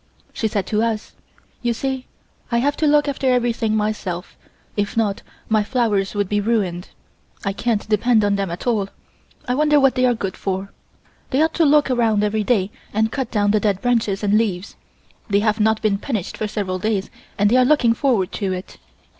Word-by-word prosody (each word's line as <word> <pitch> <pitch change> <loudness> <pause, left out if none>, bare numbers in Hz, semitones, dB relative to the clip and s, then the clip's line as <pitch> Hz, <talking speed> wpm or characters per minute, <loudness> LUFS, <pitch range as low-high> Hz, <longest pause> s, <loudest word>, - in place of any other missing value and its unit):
She 220 - -1
said 200 -3 -1
to 210 +2 0
us: 225 -2 -2 0.5
"You 240 -1 0
see 265 +1 -3 0.4
I 235 - +2
have 285 +4 +1
to 310 - +2
look 295 0 +4
after 275 -1 0
everything 235 -3 +1
myself, 210 -5 -3 0.4
if 205 +2 -2
not, 210 -3 0 0.3
my 215 -1 +3
flowers 210 -5 0
would 205 -1 0
be 205 +1 0
ruined. 200 -5 -1 0.6
I 195 - 0
can't 220 0 -1
depend 220 +1 +3
on 200 0 +2
them 195 -2 -2
at 170 +1 -6
all. 215 -5 0 0.6
I 250 - +1
wonder 295 +2 +4
what 270 -1 +4
they 255 0 +2
are 245 - +2
good 195 -4 -4
for. 195 0 -3 0.6
They 265 - 0
ought 320 - +1
to 335 - +3
look 290 -1 +4
around 225 -4 +2
every 210 +1 0
day 205 -3 +1 0.2
and 220 +1 +1
cut 265 -2 -3
down 205 -2 +1
the 215 - +3
dead 205 -3 0
branches 220 -4 0
and 205 +1 +3
leaves. 200 -4 -2 0.5
They 200 0 +3
have 215 0 +1
not 220 +1 +2
been 200 -2 +1
punished 215 -7 -3
for 215 - -3
several 195 -3 -3
days 205 -1 -1 0.3
and 205 +1 +3
they 250 - +5
are 255 - +6
looking 250 -4 +4
forward 230 -7 +1
to 195 -3 -2
it." 185 0 -8
215 Hz, 200 wpm, -21 LUFS, 200-245 Hz, 0.6 s, are